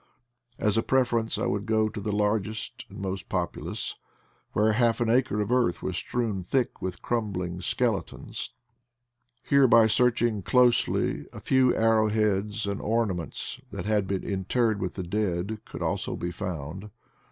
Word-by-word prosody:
As 105 0 +2
a - - +3
preference 120 -3 +1
I - - -1
would 100 +2 -1
go 110 -1 +3
to 105 - -6
the 105 - -2
largest 105 +1 -1
and - - -11
most 95 -1 -4
populous, - - -3 0.6
where 105 +1 +3
half 115 +1 +2
an 115 -2 +2
acre 120 -4 +2
of 105 +3 -2
earth 125 -8 +2
was - - -2
strewn 115 -6 -2
thick 125 +8 -1
with 95 -1 -5
crumbling 95 -7 -2
skele - - +1
tons. - - -8 0.9
Here 140 -1 +5
by 115 -1 +7
searching 120 -1 +2
closely 125 +5 +2
a - - -9
few 130 -1 +3
arrow 110 -1 +4
heads 105 0 0
and 100 0 -3
ornaments, 105 -6 -2
that - - -6
had 105 -2 +1
been 95 -1 -2
interred 105 +2 0
with 95 - -3
the 95 - -3
dead, 100 +2 -1
could - - -6
also - - -1
be 85 - -3
found. 85 +3 -5
105 Hz, 160 wpm, -27 LUFS, 95-115 Hz, 0.9 s, by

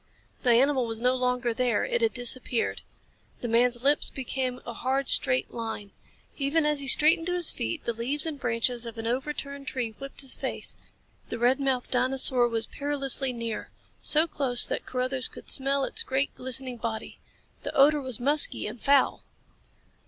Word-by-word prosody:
The 250 - 0
animal 255 +1 +3
was 225 -1 -5
no 250 +2 +2
longer 250 -1 -1
there. 245 +1 0
It - - -2
had 455 -1 +2
disappeared. 245 -1 0 0.6
The 240 - -3
man's 240 +1 +1
lips 285 +2 +2
became 255 -1 -4
a 235 - -6
hard, 265 +3 -2
straight 255 0 +4
line. 225 -3 -6 0.5
Even 295 +3 0
as 300 -1 0
he 275 - -5
straightened 325 +5 +4
to 355 - -1
his 350 -2 +2
feet 115 0 -5
the 235 - -1
leaves 255 +7 -1
and 310 -3 -5
branches 240 0 -1
of 230 0 -9
an 225 - -6
overturned 280 +3 -4
tree 250 -3 -3
whipped 275 +1 -6
his 270 -2 0
face. - - -5 0.5
The - - -4
red 245 +3 +2
mouthed 265 -3 -1
dinosaur 255 -1 +4
was 225 -1 -2
perilously 275 -1 0
near. 230 -2 -5 0.3
So 310 +2 +4
close 270 -7 +7
that - - -4
Carruthers 255 0 0
could - - -7
smell 275 0 +1
its 450 - -3
great, 270 -9 -2
glistening 255 -1 -5
body. 225 -1 -6 0.4
The - - -6
odor 290 +2 +4
was 260 -3 -5
musky 290 +4 0
and 220 +3 -7
foul. 280 -1 +2
255 Hz, 175 wpm, -26 LUFS, 240-280 Hz, 0.6 s, close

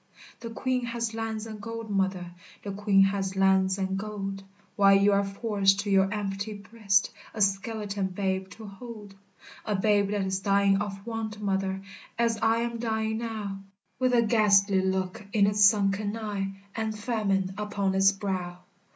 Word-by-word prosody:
The 230 - -7
Queen 250 +1 -1
has 230 -1 -3
lands 225 -1 -3
and 215 -2 -8
gold, 230 0 -6
mother, 190 -3 -1 0.3
The 200 - -4
Queen 195 -1 +3
has 195 -1 0
lands 190 0 +3
and 190 0 -2
gold, 195 -2 -5 0.3
While 195 -1 +6
you 200 +1 +4
are 200 0 +3
forced 200 -1 +1
to 205 -1 -3
your 195 0 +4
empty 205 0 -3
breast 200 -1 0 0.2
A 215 - -3
skeleton 200 0 0
babe 190 0 -2
to 220 - -11
hold, 210 0 -10 0.5
A 210 - -1
babe 205 0 +2
that 205 0 -1
is 190 0 -1
dying 200 0 +3
of 195 -1 -5
want, 225 -2 -4
mother, 195 -1 -1 0.4
As 230 -1 +1
I 225 +1 +3
am 235 0 -3
dying 220 -1 -1
now, 215 -4 -4 0.4
With 255 -1 +2
a 235 - +5
ghastly 200 -3 +4
look 190 0 -2
in 205 -2 +4
its 205 +1 +3
sunken 205 +1 +3
eye, 205 -3 -3 0.2
And 220 -1 -2
famine 205 -4 -1
upon 205 -2 -1
its 195 +1 +5
brow. 190 -3 -4
200 Hz, 165 wpm, -27 LUFS, 195-220 Hz, 0.5 s, While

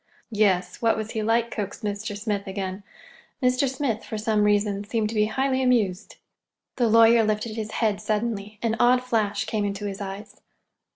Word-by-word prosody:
"Yes, 195 -4 +1
what 230 -1 +3
was 220 0 -4
he 220 - -2
like?" 230 +2 +1
coaxed 205 +1 -5
Mr. 205 0 -3
Smith 205 -1 -3
again. 190 0 -4 0.6
Mr. 255 +1 +2
Smith, 260 -5 -2
for 220 - -5
some 215 -1 +1
reason, 205 -1 +1
seemed 215 0 -1
to - - -5
be 210 0 +3
highly 265 +3 0
amused. 225 -7 +1 0.6
The 240 -3 +2
lawyer 230 +1 +6
lifted 215 +1 -1
his 220 -1 -5
head 210 -3 0
suddenly. 215 -1 -2
An 225 -1 +1
odd 250 +1 +4
flash 215 -4 0
came 205 -2 -1
to 200 +1 -6
his 200 0 -5
eyes. 195 +1 -8
215 Hz, 175 wpm, -25 LUFS, 205-230 Hz, 0.6 s, lawyer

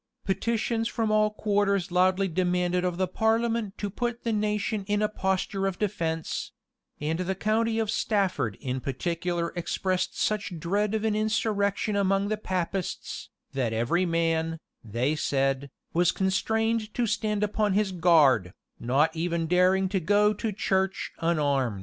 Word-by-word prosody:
[] - - -48
Petitions 225 +3 0
from 225 -2 -1
all 215 0 +4
quarters 200 -3 0
loudly 185 +2 +3
demanded 180 0 0
of 180 -1 -1
the 185 0 +1
parliament 225 +1 0
to 205 - -2
put 240 +4 -3
the 230 - 0
nation 210 0 -1
in 205 0 +1
a 210 - +2
posture 195 -1 -1
of 190 -1 -3
defence; 165 -6 -2 0.5
and 155 +3 -2
the 185 +1 -1
county 220 +3 +1
of 220 -2 0
Stafford 190 - 0
in 130 0 -3
particular 170 +5 -2
expressed 180 +2 -1
such 205 -4 -1
dread 205 +6 0
of 220 0 -1
an 215 -1 +1
insurrection 215 -1 0
among 195 0 +1
the 215 - 0
Papists, 185 -2 -3 0.2
that 125 -4 -1
every 150 +12 +1
man, 165 -1 0 0.2
they 120 +7 -1
said, 135 -1 0 0.2
was 175 0 +3
constrained 220 +3 0
to 245 - +1
stand 210 -1 0
upon 210 -1 +1
his 205 0 +1
guard, 150 - +4 0.3
not 145 +7 +2
even 170 0 -1
daring 180 +3 +3
to 190 0 0
go 205 +4 +3
to 215 +2 -3
church 190 -1 -1
unarmed. 140 - +1
190 Hz, 150 wpm, -27 LUFS, 170-210 Hz, 0.5 s, all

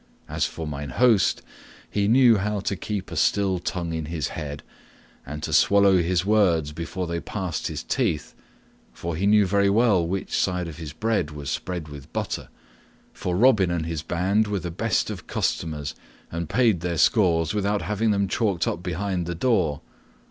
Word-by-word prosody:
As - - 0
for 80 - -6
mine 75 -1 -5
host, 110 - +3 0.4
he 100 -1 0
knew 120 0 +6
how 105 +1 -1
to 100 - -1
keep 100 +2 -5
a - - -5
still 95 -3 +2
tongue 85 -1 -3
in 80 -1 -3
his 80 -1 -3
head, 75 -3 -6 0.6
and 75 +2 -6
to 80 - -3
swallow 100 +4 +5
his 90 +1 0
words 90 -8 +3
before 85 +4 -4
they 85 0 -3
passed 90 -4 -4
his - - -5
teeth, 75 - -1 0.6
for 85 -1 -4
he 95 +5 0
knew 105 0 +5
very 100 +1 +2
well 105 -4 +3
which 95 +3 -3
side 90 -2 0
of 80 -2 -8
his 80 -3 -7
bread 105 -1 -1
was 75 -2 -6
spread 90 -4 -4
with 70 -2 -11
butter, - - -3 0.6
for 90 -1 -2
Robin 110 -5 +5
and 85 -2 -1
his 80 -2 -3
band 95 +6 +1
were 105 -1 -1
the 85 -1 -5
best 110 +4 0
of 95 -4 -8
customers 75 -2 -2 0.4
and 85 -1 -4
paid 115 -8 +3
their 85 0 -2
scores 80 +1 +3
without 105 0 0
having 105 +2 0
them 100 -1 +2
chalked 95 -4 0
up 85 - -2
behind 90 0 -2
the 85 - -3
door. 85 - +1
90 Hz, 180 wpm, -24 LUFS, 80-100 Hz, 0.6 s, knew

